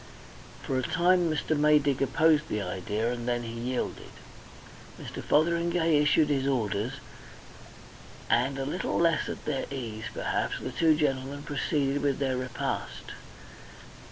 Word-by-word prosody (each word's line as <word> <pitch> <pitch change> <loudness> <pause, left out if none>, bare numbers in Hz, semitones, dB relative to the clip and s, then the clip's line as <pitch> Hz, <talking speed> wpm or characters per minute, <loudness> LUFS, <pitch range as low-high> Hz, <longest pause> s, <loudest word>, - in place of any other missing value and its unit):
For 130 - -1
a - - 0
time 175 +4 +2
Mr. 155 0 0
Maydig 145 -2 +3
opposed 155 +2 +3
the 105 - -1
idea, 105 +4 -2
and 120 0 -5
then 120 -1 0
he 115 -1 -6
yielded. 120 +2 -3 0.9
Mr. - - -7
Fotheringay 170 0 +2
issued 150 +1 +3
his 135 -2 +1
orders, 115 -2 0 1.3
and 130 +3 +2
a 135 - -2
little 170 +7 -2
less 165 -2 +2
at - - -7
their 135 -3 -2
ease, 115 -5 -5
perhaps, - - -1
the - - -5
two 160 -2 +3
gentlemen 140 -1 -1
proceeded 145 -1 -1
with 140 -2 +1
their 135 -2 0
repast. 120 - -4
140 Hz, 135 wpm, -28 LUFS, 125-155 Hz, 1.3 s, Maydig